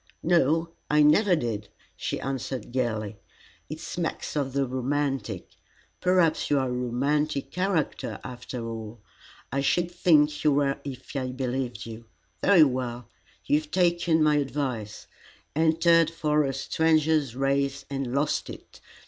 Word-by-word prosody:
"No, 165 -1 +3 0.2
I 150 0 +5
never 180 +6 +5
did," 110 -8 -3 0.3
she - - -3
answered 130 -1 -4
gaily. 110 -5 -2 0.5
"It 155 +1 -6
smacks 170 -2 -4
of 140 -3 -1
the 140 0 +1
romantic. 135 -1 -2 0.5
Perhaps 180 -3 +2
you 145 - +3
are 130 -1 0
a - - -2
romantic 135 +4 -1
character, 185 -5 -1
after 125 -2 -6
all. 110 0 -7 0.5
I 140 +2 0
should 175 +5 +1
think 155 -4 +3
you 150 - +4
were 140 0 +1
if 135 0 -8
I 130 -2 -1
believed 130 -1 -3
you. 115 0 -9 0.4
Very 185 -5 +7
well; 125 -3 -2 0.4
you 145 - +3
have 155 -1 -11
taken 170 -2 +2
my 150 -1 +4
advice, 135 -7 -3 0.5
entered 165 +1 +4
for 150 -2 +1
a 135 - -1
Stranger's 155 -2 +1
Race 135 0 0
and 135 -3 -3
lost 140 +3 0
it. - - -12
140 Hz, 140 wpm, -26 LUFS, 125-155 Hz, 0.5 s, Very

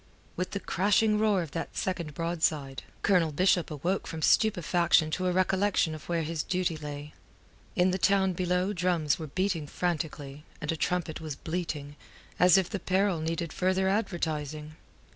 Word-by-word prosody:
With 180 +1 -2
the 200 - -3
crashing 210 +3 +2
roar 210 -4 +2
of 160 - -9
that 165 - -5
second 170 -6 -3
broadside, 160 -5 -1 0.2
Colonel 180 -5 +3
Bishop 180 +2 +2
awoke 170 +6 -2
from 160 -1 -5
stupefaction 170 -6 +3
to 185 +3 -1
a - - +2
recollection 185 -2 +2
of 155 +1 -10
where 170 -1 0
his 160 0 -2
duty 180 -1 -1
lay. 150 -1 -7 0.6
In 185 -2 +3
the 185 - -1
town 190 -1 +3
below 180 +2 0
drums 175 -5 +1
were 160 - -5
beating 180 -1 -1
frantically, 150 -4 -3 0.2
and 150 - -2
a - - -1
trumpet 170 -1 -2
was 155 -3 -5
bleating, 155 -4 -4 0.4
as 180 +2 +7
if 190 -2 +2
the 200 - -4
peril 190 -2 +1
needed 165 +1 -3
further 185 +1 +1
advertising. 155 -7 -2
175 Hz, 160 wpm, -29 LUFS, 155-185 Hz, 0.6 s, as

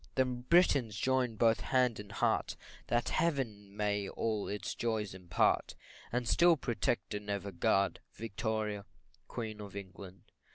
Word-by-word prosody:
Then 125 -2 +1
Britons 140 - +4
join 130 -2 +1
both 115 +1 +4
hand 125 -4 +2
and 105 -1 -8
heart, 100 - +1 0.3
That 120 0 +1
Heaven 110 -11 -1
may 105 -1 0
all 110 -3 -1
its 105 -1 -3
joys 110 -4 -1
impart, 90 -2 +1 0.4
And 120 0 -1
still 170 +3 +5
protect 120 -3 -1
and 105 0 -5
ever 100 0 -2
guard 95 +2 +2 0.2
Victoria, 110 -1 -2 0.4
Queen 110 -3 -5
of 100 -1 -9
England. 95 -1 -9
110 Hz, 135 wpm, -33 LUFS, 100-120 Hz, 0.4 s, still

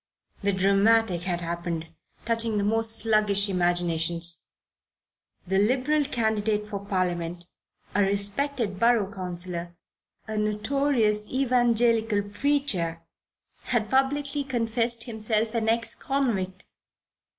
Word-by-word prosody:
The 200 -1 +1
dramatic 195 0 +3
had 175 -1 -2
happened, 170 -1 -3 0.4
touching 230 -1 0
the 200 - +1
most 225 +2 +2
sluggish 210 -2 +2
imaginations. 170 -2 +1 1.0
The 190 +2 +1
Liberal 265 +7 +2
candidate 220 -5 0
for 200 -2 -6
Parliament, 175 -3 -2 0.5
a 205 - +2
respected 200 +2 0
Borough 230 -4 +3
Councillor, 175 -2 -4 0.5
a 215 0 -3
notorious 215 0 +1
Evangelical 235 -4 +2
preacher, 205 - -1 0.6
had 220 -4 0
publicly 280 +2 +1
confessed 235 -2 -1
himself 220 -1 -1
an 225 -2 0
ex 230 0 0
convict. 200 -10 -2
210 Hz, 100 wpm, -26 LUFS, 185-235 Hz, 1.0 s, dramatic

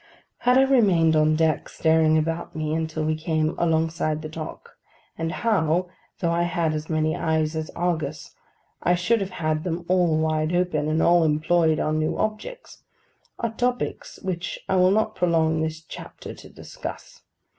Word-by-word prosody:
How 250 - +3
I 265 +1 +6
remained 195 -12 +4
on 155 0 +3
deck, 160 -1 +1
staring 160 -1 +3
about 165 +1 -2
me, 155 -1 -2
until 160 -1 -2
we 155 - +1
came 155 0 -1
alongside 160 -2 0
the 155 - -5
dock, 155 0 -8 0.4
and 165 0 -3
how, 180 -6 +1 0.3
though 170 -2 +1
I 170 +1 +1
had 170 -2 0
had - - -3
as 155 +1 -5
many 155 -1 +1
eyes 160 -1 0
as 160 0 -3
Argus, 175 -2 -2 0.5
I 175 - +3
should 205 +6 +1
have 195 - -2
had 155 -3 -2
them 175 -1 -3
all 175 -3 +3
wide 155 +1 0
open, 175 -4 0
and 155 +1 +1
all 175 0 +5
employed 160 +1 +2
on 155 0 0
new 155 - -1
objects—are 230 - -6
topics 245 +2 -2
which 180 -2 -3
I 190 - +1
will 185 0 +5
not 215 +2 +1
prolong 160 -3 +1
this 160 0 -2
chapter 155 - -9
to - - -13
discuss. - - -9
160 Hz, 165 wpm, -24 LUFS, 155-180 Hz, 0.5 s, I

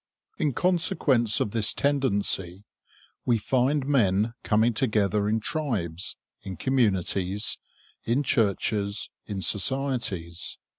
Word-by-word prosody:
In 145 - 0
consequence 140 - +2
of 105 - -2
this 110 -1 +3
tendency, 100 -9 0 0.6
we 120 -2 +1
find 130 +5 0
men 110 -5 +1
coming 110 +2 +1
together 105 -1 0
in 110 +1 0
tribes, 105 - -3 0.3
in 95 -3 -8
communities, 100 -5 +1 0.4
in 120 +5 -1
churches, 100 -3 0 0.2
in 100 -2 -5
societies. 105 -7 +1
110 Hz, 100 wpm, -25 LUFS, 100-130 Hz, 0.6 s, this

